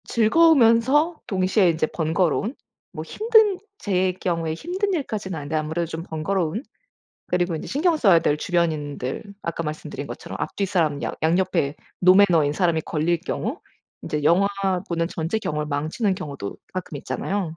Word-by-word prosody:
즐거우면서 275 +4 +4
동시에 185 0 +2
인제 160 -1 0
번거로운? 170 - 0 0.4
뭐 - - -6
힘든 435 -3 +3 0.2
제 185 - +1
경우에 170 -3 -2
힘든 375 - -2
일까지는 215 - -3
아닌데 145 +1 -4
아무래도 155 +2 -1
좀 165 0 -6
번거로운? 175 - -2 0.6
그리고 175 -1 0
인제 - - -6
신경 320 +5 +1
써야 195 - +5
될 145 - +1
주변인들 150 -6 -1 0.2
아까 170 0 -3
말씀드린 155 -1 -5
것처럼 - - -7
앞 - - -3
뒤 200 - 0
사람 160 -7 0
양 - - -2
양 165 +3 +3
옆에 175 -7 0 0.3
노매너인 180 -5 +5
사람이 170 -1 +1
걸릴 165 +2 0
경우 - - -3 0.4
이제 150 -1 -3
영화 175 +6 +4 0.4
보는 165 -1 -1
전체 170 +5 -2
경험을 150 -7 -3
망치는 155 +8 -1
경우도 140 - -6 0.2
가끔 180 -4 -5
있잖아요. 175 +3 -3
175 Hz, 355 characters per minute, -23 LUFS, 160-210 Hz, 0.6 s, 써야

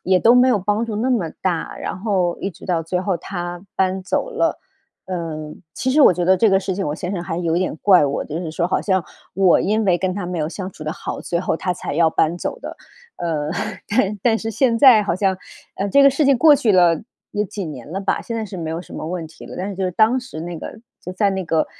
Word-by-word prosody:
也 185 0 +4
都 230 - +6
没 250 +1 +6
有 230 -5 +3
帮 210 +4 0
助 225 - -5
那 250 +4 0
么 185 -10 0
大， 175 -3 -2
然 - - -5
后 185 -4 0
一 195 - -3
直 170 - -15
到 170 -3 0
最 180 +2 -1
后 185 -1 -1
她 175 0 -6
搬 190 0 0
走 - - -1
了。 460 - 0 0.5
呃， 160 -4 -5 0.2
其 260 - -1
实 300 - +3
我 270 - +8
觉 175 0 -2
得 190 +1 +4
这 220 +3 +4
个 195 0 +3
事 190 -1 -3
情 195 - -2
我 145 - -2
先 180 +3 -5
生 195 - -3
还 165 -2 -4
有 170 -1 0
点 185 -3 -1
怪 185 -7 +6
我， 140 - -2
就 155 +2 -5
是 165 -3 -5
说 170 +1 -1
好 - - +1
像， 190 -4 0 0.3
我 190 -2 +4
因 215 +2 +1
为 180 -3 +3
跟 185 +1 -1
她 200 -2 -4
没 180 -1 -3
有 155 0 -1
相 190 +2 -6
处 155 - -11
得 155 - -2
好， - - -6
最 170 0 -2
后 165 - -1
她 180 0 -2
才 - - -5
要 165 +1 +4
搬 160 +2 +1
走 - - -3
的。 - - -7 0.4
呃， 155 -3 -2 0.4
但 210 -2 +1
但 225 -2 +3
是 225 - -4
现 230 +1 +1
在 240 -6 +7
好 195 - -1
像， 190 -1 +1 0.4
呃， 200 - -2
这 280 +6 +5
个 - - +9
事 275 +2 +1
情 270 -2 +4
过 305 +2 +7
去 240 -5 +1
了， 175 -3 +4 0.3
有 210 - 0
几 200 0 -6
年 145 -3 -8
了 195 - -3
吧， 195 - -1
现 230 - -5
在 220 - -2
是 200 -2 -8
没 160 -2 -4
有 165 +1 -3
什 - - -14
么 - - -5
问 175 -2 -4
题 160 - -14
了， - - -9
但 190 +2 -3
是 200 - -5
就 190 0 -2
是 180 - 0
当 220 +7 +3
时 245 -11 -9
那 170 0 -5
个 220 - -8 0.3
就 180 - -5
在 200 +2 +1
那 190 -1 -3
个 160 -1 +1
185 Hz, 290 characters per minute, -20 LUFS, 170-210 Hz, 0.5 s, 个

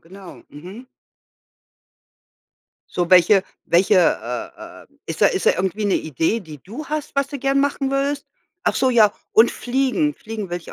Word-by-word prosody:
genau, 190 +2 -13
mhm. 190 - -11 2.0
So, 175 0 -2
welche 185 +2 +6 0.2
welche, 180 +5 +3
äh 125 -8 -2
äh - - -26 0.2
ist - - -6
da - - +6
ist - - -1
da - - +7
irgendwie 190 +3 -2
'ne 200 - +1
Idee, 160 - -1
die 155 -5 -11
du 245 +11 -8
hast, 305 0 -4
was 280 0 +1
du 285 - -6
gerne 275 +1 +1
machen 280 -1 -1
würdest? 275 +1 -1 0.4
Ach - - +1
so, 260 - +2
ja, 215 -4 +5 0.2
und 225 +2 +5
fliegen. 270 +4 -1
Fliegen 215 -3 -7
will 175 - -2
ich 170 - -10
215 Hz, 170 wpm, -21 LUFS, 180-275 Hz, 2.0 s, da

